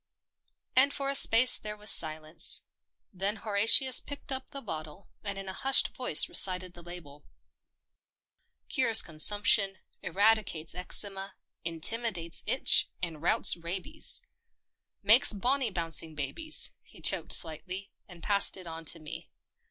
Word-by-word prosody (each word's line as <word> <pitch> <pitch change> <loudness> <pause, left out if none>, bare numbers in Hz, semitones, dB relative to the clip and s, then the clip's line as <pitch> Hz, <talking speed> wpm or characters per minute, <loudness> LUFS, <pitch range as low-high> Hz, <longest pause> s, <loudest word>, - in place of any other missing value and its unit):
And 275 +2 +4
for 275 0 -4
a - - -5
space 250 -2 +5
there 210 0 -9
was 210 0 -1
silence. 155 +1 +1 0.5
Then 195 +3 -3
Horatius 225 +5 +3
picked 285 0 -10
up 265 0 -6
the 280 - -9
bottle, 160 - -10
and 200 -2 -7
in 195 0 -9
a 190 - -5
hushed 270 +6 0
voice 250 -12 +2
recited 185 -1 0
the 175 - -14
label. 165 -4 -13 0.7
" - - -48
Cures 235 -6 +2
consumption, 195 +4 +2 0.2
eradicates 200 -6 -1
eczema, 195 +2 -2 0.3
intimidates 170 +1 -1
itch, 260 - +3
and 165 -4 -7
routs 170 - +3
rabies. 185 - 0 0.8
Makes 220 +4 +5
bonny 250 +5 -1
bouncing 165 -3 -4
babies." 310 - -1
He - - -21
choked - - 0
slightly, 185 +5 -4 0.2
and 175 -3 -16
passed 200 -1 +2
it 185 - -11
on 165 -1 -10
to 165 - +4
me. 155 -1 -12
195 Hz, 135 wpm, -27 LUFS, 165-225 Hz, 0.8 s, space